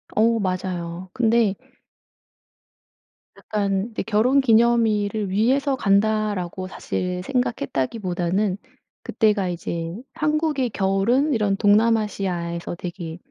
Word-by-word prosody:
어 230 +1 +3
맞아요. 185 -2 -3
근데 225 -4 +2 1.8
약간 200 -1 -1
근데 230 - -5
'결혼 230 +6 +3
기념일을 220 -4 +2
위해서 265 +8 +2
간다.'라고 200 -4 0
사실 180 -1 -3
생각했다기보다는 185 - -1 0.5
그때가 210 -3 +1
이제 170 -1 -4 0.2
한국의 300 -4 0
겨울은 205 +9 +1
이런 205 -4 +1
동남아시아에서 205 -6 +1
되게 170 -2 -6
205 Hz, 250 characters per minute, -23 LUFS, 185-230 Hz, 1.8 s, 어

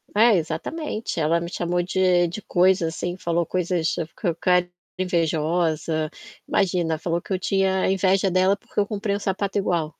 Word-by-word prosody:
É, 225 +1 +6
exatamente, 195 - -3
ela 160 +2 +2
me 170 +2 -6
chamou 175 0 -1
de 180 -1 +2
de 175 +6 -6
coisas 180 -3 +2
assim 175 0 -3
falou 170 -1 0
coisas 175 -2 0
falou 165 +1 -3
que - - -8
eu 180 - +6
era 180 0 +2 0.3
invejosa. 165 -2 0 0.4
Imagina, 175 -4 +1
falou 170 +1 -2
que - - -13
eu 185 - +1
tinha 190 0 +1
inveja 190 0 +2
dela, 185 +2 +3
porque 205 - -5
eu 200 - +2
comprei 205 -1 -2
um - - -3
sapato 195 0 -2
igual. 165 -5 -1
180 Hz, 175 wpm, -23 LUFS, 165-190 Hz, 0.4 s, É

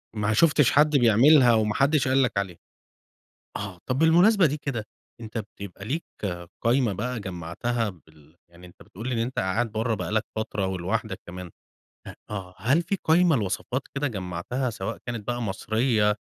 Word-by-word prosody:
ما 105 0 0
شفتش 150 +2 +4
حد 150 0 +4
بيعملها 120 +2 +6
وما 105 -1 +2
حدش 140 -1 +2
قال 135 +1 +3
لك 115 -5 -1
عليها، 95 -4 -2 1.0
آه، 100 -4 -6
طب 130 +1 0
بالمناسبة 175 +4 +5
دي 150 +2 -1
كده 130 -7 -4 0.4
أنت 115 0 -6
بتب 105 - -5
بيبقى 100 0 -8
ليك 150 +9 -3 0.6
قايمة 120 -2 +2
بقى 115 +4 -3
جمّعتها 95 +6 -3
بال 80 -2 -21
يعني 85 +1 -15
أنت 90 - -16
بتقول 115 +7 -8
لي 130 - -1
إن 115 - -1
أنت 120 +3 -2
قاعد 105 +5 0
بره 110 +1 0
بقى - - -4
لك 110 0 +1
فترة 110 -3 -2
ولوحدك 95 +3 -3
كمان 90 0 -8 0.6
ه - - -7 0.2
آه، 95 -3 -6
هل 130 - +2
في 195 +3 -2
قايمة 165 -1 +4
لوصفات 115 +5 -2
كده 145 +1 0
جمّعتها 95 +5 -3
سواء 110 0 -5
كانت 120 -4 -5
بقى 120 0 -2
مصرية 110 0 +1
115 Hz, 175 wpm, -25 LUFS, 95-130 Hz, 1.0 s, بيعملها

